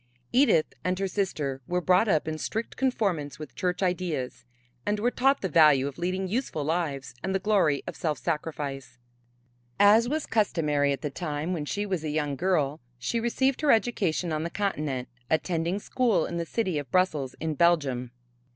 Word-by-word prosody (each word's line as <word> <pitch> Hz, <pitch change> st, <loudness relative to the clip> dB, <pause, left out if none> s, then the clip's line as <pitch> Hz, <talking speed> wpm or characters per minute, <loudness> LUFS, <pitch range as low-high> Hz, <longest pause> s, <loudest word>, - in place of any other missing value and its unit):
Edith 250 Hz, -, +4 dB
and 180 Hz, 0 st, 0 dB
her 195 Hz, 0 st, -1 dB
sister 150 Hz, -9 st, -2 dB
were 180 Hz, 0 st, 0 dB
brought 185 Hz, +4 st, +3 dB
up 155 Hz, -6 st, +2 dB
in 155 Hz, 0 st, -3 dB
strict 225 Hz, +7 st, -3 dB
conformance 185 Hz, -, -1 dB
with 150 Hz, -5 st, -9 dB
church 180 Hz, +1 st, -1 dB
ideas 175 Hz, -8 st, -2 dB, 0.4 s
and 205 Hz, 0 st, 0 dB
were 240 Hz, +4 st, +1 dB
taught 270 Hz, +3 st, +2 dB
the 190 Hz, -, 0 dB
value 150 Hz, -5 st, +5 dB
of 140 Hz, +3 st, -7 dB
leading 185 Hz, +2 st, -1 dB
useful 210 Hz, -, -2 dB
lives 145 Hz, -5 st, -2 dB
and 190 Hz, 0 st, -1 dB
the -, -, +2 dB
glory 185 Hz, -8 st, +2 dB
of -, -, -6 dB
self 155 Hz, -4 st, -1 dB
sacrifice. 145 Hz, -5 st, -4 dB, 0.8 s
As 220 Hz, +4 st, +6 dB
was 310 Hz, +1 st, -1 dB
customary 150 Hz, -9 st, +1 dB
at 135 Hz, -2 st, -3 dB
the 150 Hz, -, -2 dB
time 150 Hz, +4 st, -3 dB
when 155 Hz, -4 st, -3 dB
she 205 Hz, +7 st, -2 dB
was 185 Hz, -5 st, -2 dB
a 155 Hz, -, -2 dB
young 150 Hz, -2 st, -1 dB
girl 155 Hz, -4 st, 0 dB, 0.2 s
she 125 Hz, -, -1 dB
received 260 Hz, +4 st, +1 dB
her 300 Hz, -, +1 dB
education 190 Hz, -8 st, +1 dB
on 155 Hz, -, -1 dB
the 170 Hz, -, -2 dB
continent, 150 Hz, -11 st, -2 dB, 0.2 s
attending 165 Hz, +2 st, 0 dB
school 235 Hz, +1 st, +1 dB
in 170 Hz, -, -4 dB
the 170 Hz, -1 st, -3 dB
city 185 Hz, -8 st, -1 dB
of 140 Hz, -3 st, -7 dB
Brussels 155 Hz, -7 st, +1 dB
in 160 Hz, -1 st, -2 dB
Belgium. 145 Hz, -7 st, +2 dB
170 Hz, 180 wpm, -27 LUFS, 150-200 Hz, 0.8 s, As